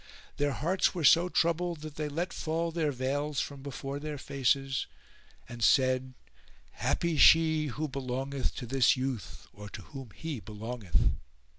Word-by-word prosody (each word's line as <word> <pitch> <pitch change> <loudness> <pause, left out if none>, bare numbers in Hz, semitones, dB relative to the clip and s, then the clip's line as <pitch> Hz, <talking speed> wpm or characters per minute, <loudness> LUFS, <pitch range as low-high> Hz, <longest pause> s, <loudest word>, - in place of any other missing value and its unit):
Their 145 -1 +1
hearts 180 +7 +1
were 170 - -2
so 170 +5 +6
troubled 170 -1 0
that 155 -1 -7
they 150 0 -3
let 170 +5 -3
fall 165 +1 -2
their 160 -3 0
veils 140 +2 -1
from 140 -1 -4
before 140 0 -5
their 150 0 -5
faces 135 0 0 0.6
and 120 -1 -6
said, 130 0 +3 0.6
"Happy 170 -2 -1
she 160 0 +6
who 150 +4 -3
belongeth 135 0 -3
to 125 - -5
this 130 +1 +3
youth 130 -6 -4
or 105 +1 -10
to 105 -2 -9
whom 135 0 -9
he 160 -6 -5
belongeth!" 110 -1 -3
140 Hz, 150 wpm, -30 LUFS, 130-155 Hz, 0.6 s, so